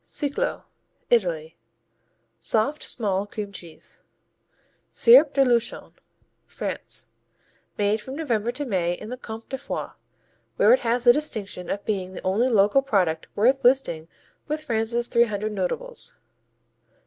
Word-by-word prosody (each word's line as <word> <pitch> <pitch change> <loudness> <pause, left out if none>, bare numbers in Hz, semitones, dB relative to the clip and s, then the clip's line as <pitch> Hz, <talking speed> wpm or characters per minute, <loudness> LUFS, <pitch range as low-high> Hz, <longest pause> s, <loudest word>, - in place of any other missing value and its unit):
Ciclo 295 - -2 0.5
Italy 165 -8 +1 0.8
Soft, 275 +8 0
small 200 -3 -1
cream 205 -1 -6
cheese. 170 -5 -11 0.9
Cierp 465 - +6
de 275 -1 +4
Luchon 240 -2 0 0.5
France - - -5 0.7
Made 210 +1 +1
from 260 +5 -7
November 240 -7 -1
to 290 +4 -5
May 180 -7 0
in 215 +5 -8
the 250 - -5
Comté 225 -2 -9
de 265 - -3
Foix, - - -4 0.7
where - - +6
it - - +4
has 240 +1 0
the 240 -1 +8
distinction 215 -11 -4
of 200 - -3
being 190 -3 -2
the - - -7
only 205 +7 +2
local 215 +2 +4
product 185 -11 0
worth 260 +6 +3
listing 240 -11 +2 0.4
with 305 +1 -3
France's 235 -2 0
three 235 -1 +4
hundred 210 -1 -3
notables. 210 - -3
225 Hz, 135 wpm, -24 LUFS, 200-265 Hz, 0.9 s, the